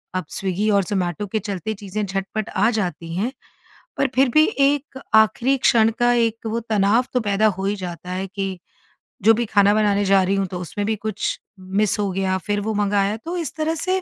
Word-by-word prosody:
अब 185 - -2
स्विगी 195 +2 -1
और 200 -1 +3
ज़ोमैटो 185 +1 -2
के 220 +3 -1
चलते 210 +1 -4
चीज़ें 205 0 -4
झटपट 195 +2 -3
आ 205 +4 +2
जाती 170 -4 -3
हैं 225 +7 -1 0.7
पर 275 - +2
फिर 265 0 +4
भी 310 - +7 0.2
एक 285 -1 -1 0.2
आखिरी 220 +5 +4
क्षण 225 -3 +4
का 240 0 +3
एक 230 -1 0
वो 225 +1 -1
तनाव 220 +1 +2
तो 250 - +3
पैदा 210 0 +1
हो 190 - -3
ही 200 +1 0
जाता 180 -1 -7
है 185 +1 -3
कि, 195 -1 -4 0.7
जो 225 +2 +7
भी 235 +2 0
खाना 205 -1 +4
बनाने 205 -1 +2
जा 195 0 +4
रही 190 +2 +1
हूँ 195 -1 0
तो 180 0 -6
उसमें 205 +4 -4
भी 220 - +1
कुछ 210 0 -3 0.2
मिस 195 +2 0
हो 200 -1 0
गया। 190 0 0
फिर 205 0 0
वो 220 +2 -2
मंगाया 205 0 +1
तो 335 +10 -5
इस 330 -6 -4
तरह 315 +1 0
से 375 +3 -1
205 Hz, 210 wpm, -22 LUFS, 195-225 Hz, 0.7 s, भी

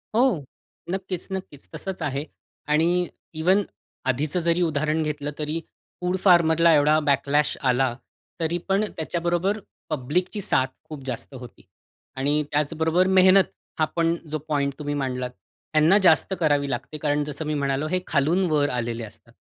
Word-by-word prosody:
हो. 235 - +3 0.5
नक्कीच, 185 -2 -4
नक्कीच. 185 -7 -7
तसंच 190 +4 -5
आहे 140 +1 -2 0.5
आणि 175 +3 +3 0.3
इव्हन 185 +6 +3 0.4
आधीचं 145 +6 0
जरी 170 +1 +1
उदाहरण 155 -1 +1
घेतलं 150 -1 -3
तरी 155 +2 -2 0.4
फूड 180 +1 0
फार्मरला 170 -2 +5
एवढा 150 +1 +4
बॅकलॅश 145 +1 +1
आला, 125 -2 +2 0.4
तरी 165 +1 0
पण 195 +2 +2
त्याच्याबरोबर 175 +5 -1 0.3
पब्लिकची 160 - -1
साथ 130 -8 +2 0.2
खूप 150 -3 -8
जास्त 130 +1 -5
होती. 125 -1 -11 0.5
आणि 145 +3 +1
त्याचबरोबर 160 +4 +1
मेहनत 190 0 +6 0.4
हा 155 - +4
पण 165 0 +2 0.2
जो 155 - 0
पॉइंट 140 -2 0
तुम्ही 145 -1 -3
मांडलात, 130 -2 -2 0.4
त्यांना 155 +6 +5
जास्त 190 -1 +4
करावी 145 -4 +2
लागते, 135 +4 -4
कारण 145 0 0
जसं 150 +1 -5
मी 150 - -1
म्हणालो, 140 +1 -1
हे 185 +2 0
खालून 160 +5 +2
वर 145 -1 +2
आलेले 120 -2 -2
असतात. 115 +2 -13
155 Hz, 145 wpm, -24 LUFS, 140-175 Hz, 0.5 s, मेहनत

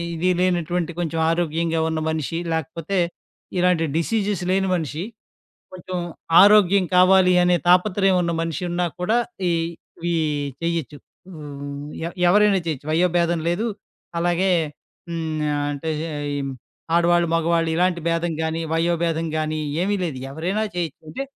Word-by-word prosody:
ఇది 170 +3 0
లేనటువంటి 175 -1 0
కొంచెం 165 -2 -2
ఆరోగ్యంగా 165 -1 0
ఉన్న 160 -1 -1
మనిషి, 160 +1 -2
లేకపోతే 160 +4 -2 0.6
ఇలాంటి 180 -2 +3
డిసీజెస్ 200 +2 0
లేని 190 0 +2
మనిషి, 160 -1 -3 0.7
కొంచెం 185 0 -5 0.4
ఆరోగ్యం 200 -2 +6
కావాలి 185 0 +6
అనే 175 0 +4
తాపత్రయం 190 +1 +4
ఉన్న 170 -1 -1
మనిషున్నా 175 +1 -2
కూడా 215 +6 +1 0.3
ఈ, - - +2 0.6
ఈ - - 0 0.5
చేయొచ్చు. 165 -4 -2 0.4
వు 155 - -9 0.7
ఎ - - -1 0.2
ఎవరైనా 205 +1 +5
చేయొచ్చు. 150 -2 -4
వయోభేదం 170 0 +2
లేదు. 200 +7 0 0.5
అలాగే, 175 +2 +1 0.6
హ్మ్, 165 -1 -3 0.2
నా 150 -1 0 0.2
అంటే 145 +3 -4 0.5
ఈ - - -2 0.6
ఆడవాళ్ళు, 175 0 +3
మగవాళ్ళు 165 0 +1
ఇలాంటి 180 0 +1
భేదం 165 0 0
గాని, 160 +1 -2
వయోభేదం 165 -1 0
గాని 155 0 -2 0.2
ఏమీ 205 +2 +1
లేదు. 145 -6 -4
ఎవరైనా 185 +8 -1
చేయొచ్చు 165 -4 -3
అంటే 270 - -4
170 Hz, 125 wpm, -22 LUFS, 165-180 Hz, 0.7 s, ఆరోగ్యం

